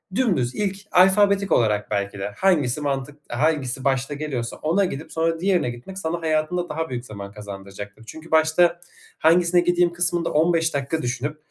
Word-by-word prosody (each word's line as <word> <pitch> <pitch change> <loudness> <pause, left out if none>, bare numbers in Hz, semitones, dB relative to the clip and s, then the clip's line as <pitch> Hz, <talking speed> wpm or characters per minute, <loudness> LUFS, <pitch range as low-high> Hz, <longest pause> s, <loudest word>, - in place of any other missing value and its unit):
dümdüz, 175 - +1
ilk, 195 -2 -1
alfabetik 200 +2 +4
olarak 105 -2 +2
belki 100 -1 -2
de 100 +1 -4
hangisi 150 -7 +2
mantık 140 0 -3
hangisi 135 -1 0
başta 135 +1 0
geliyorsa 140 -5 -4
ona 175 +6 +1
gidip 155 -3 -6
sonra 165 0 0
diğerine 180 -7 +1
gitmek 120 +11 -9
sana 170 -2 -3
hayatında 160 +2 0
daha 160 +1 -3
büyük 125 0 -5
zaman 100 -2 -8
kazandıracaktır. 100 0 -9
Çünkü 160 +5 -11
başta 165 +2 +3 0.4
hangisine 175 +2 +4
gideyim 175 0 +2
kısmında 175 -1 +1
15 165 +1 +2
dakika 140 +3 -2
düşünüp, 130 +4 -3
155 Hz, 155 wpm, -23 LUFS, 125-175 Hz, 0.4 s, alfabetik